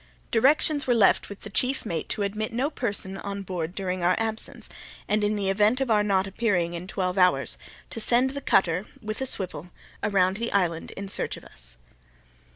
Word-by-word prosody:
Directions 285 Hz, +4 st, +3 dB
were 245 Hz, -, +3 dB
left 210 Hz, -4 st, +4 dB
with 200 Hz, -, -9 dB
the 215 Hz, -, -9 dB
chief 255 Hz, +6 st, 0 dB
mate 170 Hz, -6 st, -3 dB
to 205 Hz, -, -1 dB
admit 210 Hz, +2 st, -2 dB
no 260 Hz, +6 st, 0 dB
person 200 Hz, -7 st, -2 dB
on 200 Hz, 0 st, -5 dB
board 180 Hz, -2 st, -4 dB
during 185 Hz, -2 st, -2 dB
our 180 Hz, +1 st, +3 dB
absence, 225 Hz, -1 st, -2 dB, 0.4 s
and, 210 Hz, 0 st, +1 dB
in 210 Hz, +1 st, +1 dB
the 200 Hz, -2 st, -1 dB
event 210 Hz, +5 st, +3 dB
of 265 Hz, -3 st, 0 dB
our 210 Hz, -1 st, +4 dB
not 195 Hz, -2 st, +2 dB
appearing 190 Hz, -4 st, 0 dB
in 175 Hz, +1 st, -5 dB
twelve 185 Hz, -1 st, -1 dB
hours, 180 Hz, 0 st, +3 dB, 0.4 s
to 230 Hz, -, -5 dB
send 245 Hz, +4 st, +3 dB
the 280 Hz, +1 st, -5 dB
cutter, 185 Hz, -4 st, +2 dB
with 215 Hz, 0 st, -5 dB
a 265 Hz, -, +1 dB
swivel, 180 Hz, -, 0 dB, 0.3 s
around 190 Hz, -2 st, +2 dB
the 235 Hz, +1 st, -3 dB
island 175 Hz, -4 st, 0 dB
in 200 Hz, 0 st, -5 dB
search 195 Hz, -, 0 dB
of -, -, -14 dB
us. -, -, -14 dB
200 Hz, 195 wpm, -26 LUFS, 185-225 Hz, 0.4 s, left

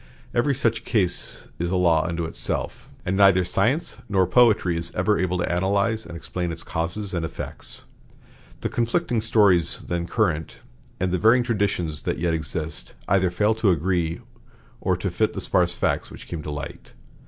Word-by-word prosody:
Every 140 Hz, +3 st, +2 dB
such 115 Hz, -3 st, 0 dB
case 95 Hz, -6 st, 0 dB
is 85 Hz, +1 st, -1 dB
a 95 Hz, -, 0 dB
law 85 Hz, -3 st, +3 dB
unto 85 Hz, -1 st, -2 dB
itself, 80 Hz, -, -3 dB, 0.2 s
and 95 Hz, -, 0 dB
neither 95 Hz, -2 st, +5 dB
science 115 Hz, -, 0 dB
nor 95 Hz, -2 st, +3 dB
poetry 100 Hz, -3 st, +4 dB
is 85 Hz, +1 st, -2 dB
ever 105 Hz, +4 st, +2 dB
able 90 Hz, 0 st, 0 dB
to 90 Hz, -, -1 dB
analyze 100 Hz, +5 st, 0 dB
and 85 Hz, -, -7 dB
explain 90 Hz, +1 st, -3 dB
its 85 Hz, -, -5 dB
causes 90 Hz, +5 st, -3 dB
and 85 Hz, -2 st, -1 dB
effects. 80 Hz, -, -5 dB, 0.8 s
The -, -, -1 dB
conflicting 120 Hz, 0 st, 0 dB
stories 100 Hz, -7 st, +3 dB
then 85 Hz, -1 st, -2 dB
current, 80 Hz, -3 st, 0 dB, 0.4 s
and 95 Hz, 0 st, 0 dB
the 90 Hz, -, 0 dB
varying 115 Hz, +5 st, +5 dB
traditions 100 Hz, -9 st, 0 dB
that -, -, -2 dB
yet 85 Hz, -1 st, 0 dB
exist, 75 Hz, -5 st, -3 dB
either 95 Hz, -2 st, +3 dB
fail 105 Hz, +5 st, +2 dB
to 110 Hz, -2 st, +1 dB
agree 85 Hz, -1 st, 0 dB, 0.6 s
or -, -, 0 dB
to -, -, -2 dB
fit -, -, +1 dB
the -, -, -4 dB
sparse -, -, +1 dB
facts -, -, 0 dB
which -, -, -11 dB
came 85 Hz, -3 st, -5 dB
to 75 Hz, -, -7 dB
light. 75 Hz, -1 st, -7 dB
90 Hz, 175 wpm, -24 LUFS, 85-105 Hz, 0.8 s, neither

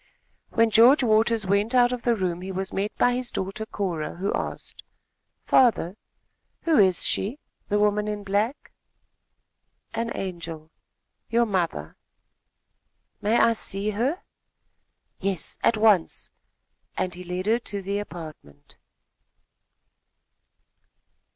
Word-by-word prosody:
When 230 Hz, -1 st, +2 dB
George 240 Hz, +6 st, +6 dB
Waters 220 Hz, -1 st, +2 dB
went 200 Hz, +5 st, +1 dB
out 245 Hz, 0 st, +5 dB
of 250 Hz, -1 st, -3 dB
the 240 Hz, -1 st, +2 dB
room, 180 Hz, -4 st, -2 dB
he 190 Hz, +1 st, -5 dB
was 190 Hz, 0 st, -4 dB
met 200 Hz, +2 st, -1 dB
by 245 Hz, -, +3 dB
his 250 Hz, 0 st, -2 dB
daughter, 195 Hz, +3 st, -4 dB
Cora, 175 Hz, -8 st, -3 dB
who 190 Hz, +4 st, -2 dB
asked: -, -, -5 dB, 0.6 s
"Father, 220 Hz, -8 st, +3 dB, 0.7 s
who 325 Hz, -3 st, +3 dB
is 185 Hz, -3 st, +4 dB
she 215 Hz, +8 st, 0 dB, 0.3 s
the 205 Hz, -, +1 dB
woman 210 Hz, 0 st, +2 dB
in 210 Hz, -1 st, -4 dB
black?" 205 Hz, +7 st, -1 dB, 1.2 s
"An 230 Hz, +1 st, -2 dB
angel 165 Hz, -4 st, -6 dB, 0.6 s
your 235 Hz, +1 st, +3 dB
mother!" 170 Hz, -, -2 dB, 1.2 s
"May 215 Hz, +3 st, +2 dB
I 230 Hz, -, +5 dB
see 205 Hz, -1 st, -2 dB
her?" 255 Hz, -, -1 dB, 1.0 s
"Yes, 195 Hz, -3 st, -2 dB
at 230 Hz, -, +3 dB
once," 210 Hz, -6 st, +2 dB, 0.7 s
and 185 Hz, -1 st, -1 dB
he 180 Hz, +1 st, -8 dB
led 180 Hz, +1 st, -4 dB
her 225 Hz, +3 st, +2 dB
to 200 Hz, -4 st, -6 dB
the 200 Hz, +2 st, -2 dB
apartment. 155 Hz, -, -10 dB
205 Hz, 120 wpm, -25 LUFS, 185-230 Hz, 1.2 s, George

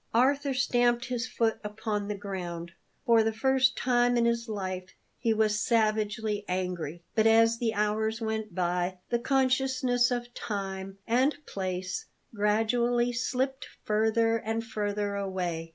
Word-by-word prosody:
Arthur 275 Hz, +3 st, +3 dB
stamped 245 Hz, -2 st, +2 dB
his 250 Hz, 0 st, -2 dB
foot 225 Hz, -3 st, 0 dB
upon 210 Hz, -1 st, -3 dB
the 210 Hz, -, -2 dB
ground. 175 Hz, -4 st, -5 dB, 0.3 s
For 230 Hz, -3 st, +5 dB
the 220 Hz, 0 st, +1 dB
first 265 Hz, +3 st, +2 dB
time 245 Hz, -1 st, +2 dB
in 235 Hz, -, +3 dB
his 235 Hz, 0 st, 0 dB
life 185 Hz, -3 st, -4 dB, 0.2 s
he 230 Hz, -2 st, +1 dB
was 215 Hz, -1 st, +2 dB
savagely 215 Hz, -2 st, +1 dB
angry. 180 Hz, -3 st, -3 dB
But 220 Hz, 0 st, +3 dB
as 225 Hz, +1 st, +5 dB
the 225 Hz, -2 st, 0 dB
hours 215 Hz, +2 st, 0 dB
went 220 Hz, -1 st, -3 dB
by, 180 Hz, 0 st, 0 dB
the 235 Hz, -, +2 dB
consciousness 255 Hz, -1 st, +2 dB
of 240 Hz, -1 st, -3 dB
time 195 Hz, -3 st, -5 dB
and 260 Hz, +6 st, +2 dB
place 185 Hz, -, -4 dB, 0.3 s
gradually 235 Hz, +3 st, +2 dB
slipped 260 Hz, +3 st, -1 dB, 0.2 s
further 220 Hz, +1 st, +2 dB
and 225 Hz, +1 st, -2 dB
further 205 Hz, -2 st, -2 dB
away. 180 Hz, -4 st, -3 dB
220 Hz, 135 wpm, -29 LUFS, 200-240 Hz, 0.3 s, For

